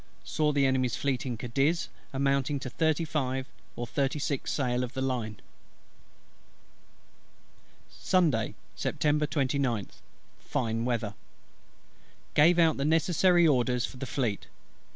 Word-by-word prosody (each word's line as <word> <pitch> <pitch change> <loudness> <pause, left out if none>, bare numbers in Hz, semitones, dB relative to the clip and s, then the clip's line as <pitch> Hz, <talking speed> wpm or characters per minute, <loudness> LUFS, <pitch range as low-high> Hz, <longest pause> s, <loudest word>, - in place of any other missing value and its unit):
Saw 155 -1 0
the 140 -1 +2
Enemy's 130 -2 +1
Fleet 135 -2 -1
in 120 -2 -3
Cadiz, 135 +8 0 0.2
amounting 140 +1 +1
to 130 - -5
thirty 160 +1 +1
five 130 -4 -2 0.3
or 120 - -4
thirty 135 +4 -1
six 140 -2 -2
sail 125 -3 0
of 125 +1 -5
the 130 - -2
line. 115 -6 -2 2.5
Sunday, 155 - +1 0.2
Sept. 120 - -3
29th. 140 - 0 0.4
Fine 115 -1 -2
weather. 115 -4 -1 1.2
Gave 165 +4 +5
out 165 -2 +4
the 140 - -1
necessary 170 +2 +4
orders 125 -3 +2
for 130 - -10
the 135 - -5
Fleet. 115 -5 -2
135 Hz, 120 wpm, -29 LUFS, 125-150 Hz, 2.5 s, Gave